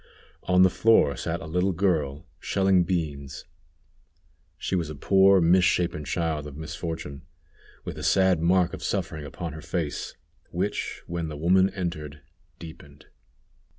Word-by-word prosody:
On 90 Hz, 0 st, +5 dB
the 95 Hz, -, +5 dB
floor 110 Hz, -, +4 dB
sat 85 Hz, +6 st, -3 dB
a -, -, -7 dB
little 90 Hz, +4 st, 0 dB
girl 80 Hz, -6 st, 0 dB
shelling 95 Hz, -2 st, +2 dB
beans. 75 Hz, -6 st, -3 dB, 1.1 s
She 95 Hz, -, -2 dB
was 85 Hz, -4 st, -1 dB
a 75 Hz, -, -6 dB
poor, 95 Hz, +5 st, +5 dB
misshapen 85 Hz, -2 st, +2 dB
child 80 Hz, -3 st, -2 dB
of 70 Hz, -1 st, -10 dB
misfortune, 80 Hz, -3 st, -6 dB, 0.6 s
with 75 Hz, -, -6 dB
a -, -, -7 dB
sad 95 Hz, +1 st, +3 dB
mark 90 Hz, +1 st, +3 dB
of -, -, -7 dB
suffering 80 Hz, -1 st, -3 dB
upon 80 Hz, +3 st, -6 dB
her 80 Hz, -, -8 dB
face, 80 Hz, -2 st, -4 dB, 0.3 s
which, 100 Hz, +4 st, -3 dB
when 85 Hz, -1 st, -4 dB
the 75 Hz, -1 st, -6 dB
woman 95 Hz, +5 st, +3 dB
entered, 80 Hz, -7 st, -5 dB, 0.4 s
deepened. 75 Hz, -3 st, -12 dB
85 Hz, 140 wpm, -26 LUFS, 75-90 Hz, 1.1 s, On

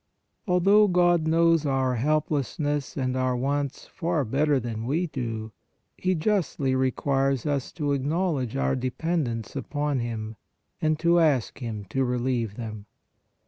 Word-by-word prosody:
Although 195 Hz, +4 st, +5 dB
God 175 Hz, -3 st, +3 dB
knows 165 Hz, 0 st, +4 dB
our 135 Hz, -3 st, +1 dB
helplessness 145 Hz, +1 st, -1 dB
and 130 Hz, -1 st, -1 dB
our 130 Hz, -1 st, +1 dB
wants 140 Hz, +2 st, -2 dB
far 165 Hz, -5 st, -1 dB
better 140 Hz, +4 st, +2 dB
than 115 Hz, -1 st, -4 dB
we 160 Hz, +7 st, +1 dB
do, 115 Hz, -7 st, -4 dB, 0.4 s
He 185 Hz, 0 st, 0 dB
justly 160 Hz, -7 st, 0 dB
requires 135 Hz, 0 st, +1 dB
us 140 Hz, -3 st, -1 dB
to 150 Hz, -4 st, -1 dB
acknowledge 140 Hz, -2 st, 0 dB
our 65 Hz, 0 st, +1 dB
dependence 130 Hz, -2 st, -2 dB
upon 145 Hz, +1 st, -1 dB
Him, 110 Hz, -2 st, -4 dB, 0.4 s
and 155 Hz, 0 st, +2 dB
to 170 Hz, +2 st, +3 dB
ask 145 Hz, -8 st, +2 dB
Him 110 Hz, -5 st, -5 dB
to 135 Hz, -, +1 dB
relieve 125 Hz, -3 st, -1 dB
them. 110 Hz, -3 st, -7 dB
140 Hz, 135 wpm, -26 LUFS, 125-160 Hz, 0.4 s, Although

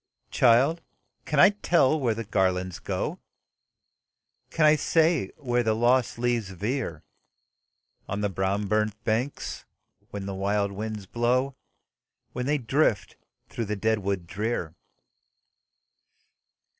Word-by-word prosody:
"Child! 130 Hz, +7 st, +4 dB, 0.4 s
can 150 Hz, -, 0 dB
I 190 Hz, -, +8 dB
tell 165 Hz, -7 st, +2 dB
where 120 Hz, -5 st, 0 dB
the 115 Hz, -, -4 dB
garlands 95 Hz, -3 st, 0 dB
go? -, -, -3 dB, 1.3 s
Can 160 Hz, -, +2 dB
I 155 Hz, 0 st, +7 dB
say 160 Hz, -, +2 dB
where 125 Hz, -4 st, 0 dB
the 110 Hz, -2 st, +1 dB
lost 120 Hz, +2 st, +2 dB
leaves 120 Hz, -4 st, 0 dB
veer 95 Hz, -, -3 dB, 1.1 s
On 100 Hz, +2 st, -2 dB
the 105 Hz, -, +1 dB
brown 95 Hz, +2 st, -1 dB
burnt 105 Hz, +1 st, 0 dB
banks, 120 Hz, +6 st, -2 dB, 0.5 s
when 100 Hz, -1 st, -6 dB
the 100 Hz, -, -4 dB
wild 100 Hz, +1 st, 0 dB
winds 105 Hz, 0 st, -5 dB
blow, 125 Hz, +6 st, 0 dB, 0.8 s
When 125 Hz, +1 st, -3 dB
they 150 Hz, +1 st, +2 dB
drift 115 Hz, -7 st, 0 dB, 0.3 s
through 115 Hz, -, -4 dB
the 105 Hz, +1 st, -2 dB
dead 110 Hz, +2 st, +1 dB
wood 100 Hz, -3 st, -2 dB
drear? 100 Hz, -3 st, -3 dB
110 Hz, 120 wpm, -26 LUFS, 100-130 Hz, 1.3 s, I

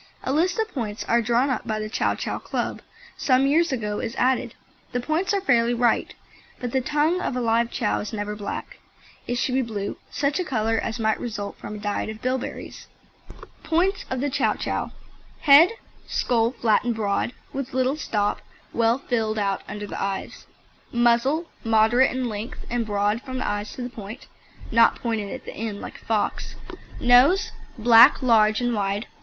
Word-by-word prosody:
A 260 Hz, -, -1 dB
list 345 Hz, +4 st, +1 dB
of 445 Hz, -1 st, 0 dB
points 220 Hz, -5 st, -4 dB
as 235 Hz, 0 st, +3 dB
drawn 240 Hz, +4 st, +2 dB
up 255 Hz, -, -3 dB
by 215 Hz, -1 st, -1 dB
the 215 Hz, 0 st, -3 dB
Chow 215 Hz, -, 0 dB
Chow -, -, -4 dB
Club -, -, -3 dB, 0.4 s
some 260 Hz, 0 st, +3 dB
years 315 Hz, +4 st, +3 dB
ago 210 Hz, -5 st, -2 dB
is 230 Hz, -, -4 dB
added. 255 Hz, +1 st, +1 dB, 0.4 s
The 245 Hz, -, 0 dB
points 315 Hz, +9 st, -1 dB
are 400 Hz, -1 st, +1 dB
fairly 240 Hz, -8 st, +3 dB
right, 235 Hz, -1 st, +1 dB, 0.4 s
but 245 Hz, -2 st, -4 dB
the 265 Hz, -, +1 dB
tongue 300 Hz, +6 st, +1 dB
of -, -, -2 dB
a -, -, -1 dB
live 230 Hz, 0 st, +2 dB
Chow 225 Hz, -3 st, -1 dB
is 210 Hz, -, -5 dB
never 210 Hz, -1 st, -4 dB
black. 205 Hz, -1 st, -6 dB, 0.5 s
It 245 Hz, -, -1 dB
should 250 Hz, +1 st, -1 dB
be 265 Hz, -, +2 dB
blue, 210 Hz, -4 st, -4 dB
such 285 Hz, +3 st, -1 dB
a -, -, +1 dB
colour 225 Hz, -7 st, 0 dB
as 225 Hz, -, -3 dB
might 220 Hz, -2 st, 0 dB
result 210 Hz, -4 st, -5 dB
from 210 Hz, -, -7 dB
a -, -, -6 dB
diet 205 Hz, 0 st, -2 dB
of 215 Hz, 0 st, -7 dB
bilberries. 255 Hz, +1 st, -4 dB, 0.8 s
POINTS 365 Hz, +5 st, +1 dB
OF 260 Hz, -1 st, -2 dB
THE 285 Hz, 0 st, -1 dB
CHOW -, -, +1 dB
CHOW: -, -, -3 dB, 0.5 s
HEAD 305 Hz, +8 st, +7 dB, 0.3 s
Skull 230 Hz, 0 st, +1 dB
flat 225 Hz, -4 st, +2 dB
and 240 Hz, -1 st, -1 dB
broad, 210 Hz, +1 st, -1 dB, 0.2 s
with 270 Hz, -2 st, -5 dB
little 260 Hz, +2 st, +2 dB
stop, 205 Hz, -8 st, -1 dB, 0.3 s
well 230 Hz, +1 st, +2 dB
filled 225 Hz, -5 st, -1 dB
out 200 Hz, -2 st, 0 dB
under 210 Hz, 0 st, -6 dB
the -, -, -6 dB
eyes. 195 Hz, 0 st, -4 dB, 0.4 s
MUZZLE 240 Hz, +7 st, +2 dB, 0.2 s
Moderate 225 Hz, +3 st, +4 dB
in 255 Hz, -1 st, -2 dB
length, 220 Hz, +3 st, -6 dB
and 235 Hz, -2 st, -1 dB
broad 205 Hz, +2 st, 0 dB
from 260 Hz, -1 st, -6 dB
the -, -, -2 dB
eyes 205 Hz, 0 st, -2 dB
to 255 Hz, -, -6 dB
the 245 Hz, -, -4 dB
point 220 Hz, 0 st, -9 dB, 0.5 s
(not 230 Hz, 0 st, +5 dB
pointed 220 Hz, -4 st, -3 dB
at -, -, -7 dB
the -, -, -7 dB
end 215 Hz, -2 st, -5 dB
like -, -, -9 dB
a -, -, -23 dB
fox). 220 Hz, -2 st, -1 dB, 0.4 s
NOSE 255 Hz, +10 st, +5 dB, 0.3 s
Black, 230 Hz, +2 st, +7 dB
large 220 Hz, -2 st, +4 dB
and 245 Hz, -1 st, 0 dB
wide. 205 Hz, +1 st, -1 dB
235 Hz, 185 wpm, -24 LUFS, 215-260 Hz, 0.8 s, HEAD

